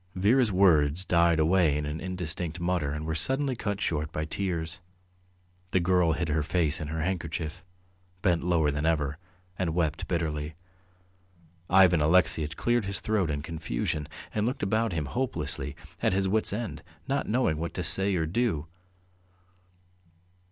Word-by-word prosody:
Vera's 110 Hz, +5 st, +3 dB
words 90 Hz, -3 st, +4 dB
died 85 Hz, -2 st, +4 dB
away 80 Hz, -1 st, +3 dB
in 75 Hz, -, -2 dB
an 75 Hz, +2 st, -4 dB
indistinct 90 Hz, -2 st, -4 dB
mutter 85 Hz, -4 st, 0 dB
and 75 Hz, +1 st, -4 dB
were 80 Hz, -, -1 dB
suddenly 135 Hz, -, 0 dB
cut 100 Hz, -3 st, -3 dB
short 75 Hz, -5 st, -1 dB
by 75 Hz, 0 st, -2 dB
tears. 80 Hz, -1 st, -3 dB, 0.9 s
The 95 Hz, -, +2 dB
girl 90 Hz, -2 st, +3 dB
hid 85 Hz, +1 st, -1 dB
her 80 Hz, +1 st, +1 dB
face 80 Hz, -1 st, 0 dB
in 75 Hz, -, -3 dB
her 80 Hz, +1 st, -2 dB
handkerchief, 85 Hz, -1 st, -3 dB, 0.6 s
bent 85 Hz, -3 st, +2 dB
lower 85 Hz, -4 st, +2 dB
than 75 Hz, +2 st, -1 dB
ever, 75 Hz, -2 st, 0 dB, 0.4 s
and 85 Hz, -4 st, 0 dB
wept 80 Hz, -4 st, 0 dB
bitterly. 75 Hz, -2 st, -2 dB, 1.1 s
Ivan 90 Hz, -3 st, +6 dB
Alexeyitch 80 Hz, -1 st, +2 dB
cleared 120 Hz, -3 st, +1 dB
his 100 Hz, 0 st, -1 dB
throat 105 Hz, -6 st, 0 dB
in 70 Hz, -1 st, -2 dB
confusion 75 Hz, -2 st, -3 dB, 0.3 s
and 105 Hz, +1 st, +1 dB
looked 130 Hz, -1 st, -3 dB
about 110 Hz, +3 st, +1 dB
him 80 Hz, -4 st, -2 dB
hopelessly, 75 Hz, -, -3 dB, 0.3 s
at -, -, +2 dB
his 95 Hz, 0 st, +1 dB
wits' 110 Hz, +3 st, +1 dB
end, 110 Hz, +2 st, -4 dB, 0.3 s
not 140 Hz, +1 st, -1 dB
knowing 110 Hz, -9 st, +2 dB
what 85 Hz, +2 st, -4 dB
to 90 Hz, -, -2 dB
say 95 Hz, +4 st, +1 dB
or 80 Hz, -2 st, +1 dB
do. 85 Hz, -3 st, 0 dB
85 Hz, 155 wpm, -28 LUFS, 80-95 Hz, 1.1 s, Ivan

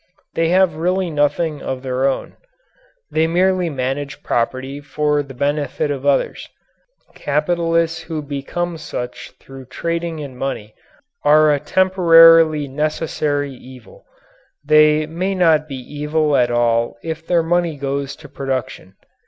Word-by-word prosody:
They 165 Hz, 0 st, +1 dB
have 185 Hz, -3 st, +3 dB
really 180 Hz, +1 st, 0 dB
nothing 145 Hz, +1 st, 0 dB
of 130 Hz, 0 st, -5 dB
their 130 Hz, +1 st, 0 dB
own. 135 Hz, -, -3 dB, 0.8 s
They 160 Hz, +1 st, +2 dB
merely 180 Hz, +1 st, +1 dB
manage 140 Hz, 0 st, -4 dB
property 130 Hz, +4 st, -2 dB
for 150 Hz, +1 st, 0 dB
the 135 Hz, -2 st, -10 dB
benefit 145 Hz, +2 st, -1 dB
of 140 Hz, 0 st, -4 dB
others. 140 Hz, -, 0 dB, 0.6 s
Capitalists 165 Hz, +2 st, 0 dB
who 155 Hz, -3 st, -5 dB
become 155 Hz, +5 st, -4 dB
such 125 Hz, -5 st, -7 dB
through 135 Hz, -1 st, -12 dB
trading 170 Hz, +4 st, -3 dB
in 140 Hz, -4 st, -7 dB
money 120 Hz, -5 st, -5 dB, 0.5 s
are 150 Hz, +1 st, +5 dB
a 145 Hz, -, 0 dB
temporarily 165 Hz, -4 st, +5 dB
necessary 145 Hz, 0 st, -2 dB
evil. 130 Hz, -, -15 dB, 0.6 s
They 155 Hz, 0 st, +4 dB
may 180 Hz, +5 st, -3 dB
not 160 Hz, -4 st, +3 dB
be 140 Hz, -, -6 dB
evil 150 Hz, +3 st, -1 dB
at 120 Hz, -2 st, +3 dB
all 120 Hz, -1 st, +1 dB
if 160 Hz, 0 st, -5 dB
their 170 Hz, -2 st, +2 dB
money 170 Hz, -2 st, 0 dB
goes 140 Hz, 0 st, -3 dB
to -, -, -14 dB
production. 130 Hz, -8 st, -5 dB
150 Hz, 130 wpm, -19 LUFS, 135-165 Hz, 0.8 s, are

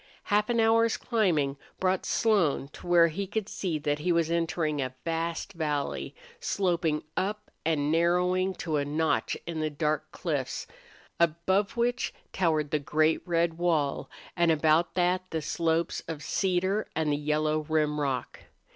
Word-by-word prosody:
Half 210 Hz, +1 st, +1 dB
an 235 Hz, -1 st, +2 dB
hour's 225 Hz, 0 st, +4 dB
climbing 165 Hz, -, +1 dB, 0.2 s
brought 185 Hz, 0 st, 0 dB
Slone 180 Hz, -11 st, +2 dB
to 165 Hz, -, -12 dB
where 170 Hz, -1 st, +6 dB
he 195 Hz, +5 st, -4 dB
could 210 Hz, +1 st, -2 dB
see 175 Hz, -7 st, -2 dB
that 145 Hz, 0 st, -1 dB
he 175 Hz, +4 st, 0 dB
was 170 Hz, -1 st, +2 dB
entering 165 Hz, -3 st, 0 dB
a 130 Hz, -1 st, -4 dB
vast 165 Hz, 0 st, -2 dB
valley, 150 Hz, -4 st, -2 dB, 0.2 s
sloping 175 Hz, -, 0 dB
up 210 Hz, +2 st, -2 dB
and 150 Hz, -2 st, +1 dB
narrowing 180 Hz, +3 st, +2 dB
to 160 Hz, -3 st, -2 dB
a 145 Hz, -, +1 dB
notch 155 Hz, +3 st, 0 dB
in 170 Hz, -2 st, -4 dB
the 155 Hz, 0 st, 0 dB
dark 150 Hz, 0 st, -1 dB
cliffs, -, -, -3 dB, 0.5 s
above 170 Hz, +6 st, +1 dB
which 240 Hz, +1 st, 0 dB, 0.2 s
towered 155 Hz, -5 st, +1 dB
the 150 Hz, -, +2 dB
great 155 Hz, +2 st, +2 dB
red 170 Hz, -1 st, +1 dB
wall 160 Hz, -5 st, 0 dB, 0.3 s
and 170 Hz, -1 st, +3 dB
about 160 Hz, +2 st, +3 dB
that 185 Hz, +1 st, +1 dB
the 160 Hz, -, -2 dB
slopes 165 Hz, +2 st, 0 dB
of 155 Hz, -3 st, -5 dB
cedar 190 Hz, +4 st, 0 dB
and 160 Hz, -2 st, +1 dB
the -, -, +2 dB
yellow 155 Hz, +1 st, 0 dB
rim 150 Hz, -1 st, +1 dB
rock. 130 Hz, -4 st, -2 dB
165 Hz, 155 wpm, -28 LUFS, 155-185 Hz, 0.5 s, where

